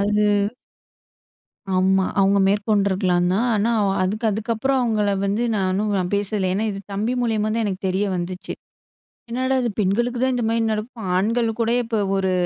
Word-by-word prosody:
அது 205 0 +2 1.3
ஆமா. 190 0 +3
அவங்க 195 +1 +4
மேற்கொண்ட்ருக்கலாம் 195 -3 +1
தான். 225 +6 +1
ஆனா, 215 +3 +1 0.2
அ - - -1
அதுக்கு 215 +5 -2
அதுக்கப்புறம் 230 +5 0
அவங்கள 215 -4 +1 0.2
வந்து 205 +4 0
நானும் 190 -1 0
பேசல. 200 -1 -1
ஏன்னா, 205 +3 0
இது 195 0 -5
தம்பி 215 +5 -1
மூலியமா 215 -2 0
தான் 230 - 0
எனக்கு 195 -2 -3
தெரிய 190 +3 0
வந்துச்சு. 180 +1 -5 0.8
"என்னாடா 260 +2 0
இது! 235 - 0
பெண்களுக்கு 235 +6 0
தான் 260 -1 +2
இந்த 240 -2 -1
மாரி 230 0 +1
நடக்கும். 215 -1 -5
ஆண்கள் 230 +4 +1
கூட 230 0 +1
இப்போ 225 -1 -2 0.2
ஒரு 190 -1 0
210 Hz, 155 wpm, -22 LUFS, 195-230 Hz, 1.3 s, அவங்க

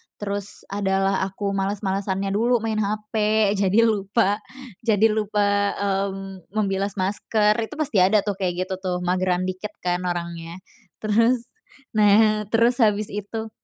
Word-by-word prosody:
Terus, 200 -1 -5
ada 195 -1 0
lah 195 0 +2
aku 200 +1 -3
males-malesannya 195 0 -1
dulu, 230 +3 +1
main 220 -1 -1
HP, 210 +1 -3 0.5
jadi 200 +3 +4
lupa 205 -1 +1 0.4
jadi 220 -1 +3
lupa, 210 -1 0 0.3
mmm, 195 -2 -3
membilas 195 -1 -1
masker, 210 +2 +1
itu 230 +6 -4
pasti 290 -9 0
ada 195 +3 +4
tuh, 205 -2 -3
kayak 185 -2 0
gitu 190 - -5
tuh, 185 -1 -2
mageran 180 0 +1
dikit 185 +3 -5
kan, 175 0 0
orangnya. 170 -1 -4 0.5
Terus 230 +3 +2 0.4
nah 215 0 +4
terus 235 +2 +4
habis 210 -2 +2
itu 220 +2 -5
200 Hz, 135 wpm, -23 LUFS, 195-215 Hz, 0.5 s, jadi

